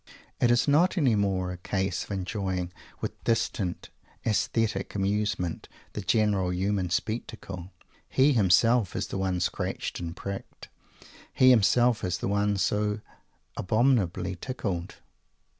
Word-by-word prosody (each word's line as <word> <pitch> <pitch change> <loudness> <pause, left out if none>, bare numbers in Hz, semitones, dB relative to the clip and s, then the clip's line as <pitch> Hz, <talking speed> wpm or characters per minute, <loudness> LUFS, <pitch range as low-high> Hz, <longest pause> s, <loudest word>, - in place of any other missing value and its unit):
It 120 - +3
is 120 +2 +3
not 165 +7 +4
any 135 -8 +3
more 95 -3 0
a 90 - -6
case 95 +1 -2
of - - -14
enjoying 95 -2 -3 0.3
with - - -5
distant 115 -5 -1 0.3
aesthetic 110 -2 0
amusement 100 -3 -1 0.2
the 105 - -4
general 100 -2 +2
human 95 0 0
spectacle. 95 -2 -4 0.4
He 140 +2 +4
himself 110 +1 +4
is - - -2
the 95 - -3
one 95 -1 0
scratched 90 - -2
and 85 -1 -5
pricked. 100 0 -7 0.6
He 130 0 +6
himself 120 +1 +4
is 90 -1 -1
the - - -3
one 100 0 +1
so 105 +2 0 0.5
abominably 95 -4 +1
tickled. 95 -6 -4
100 Hz, 125 wpm, -27 LUFS, 90-115 Hz, 0.6 s, He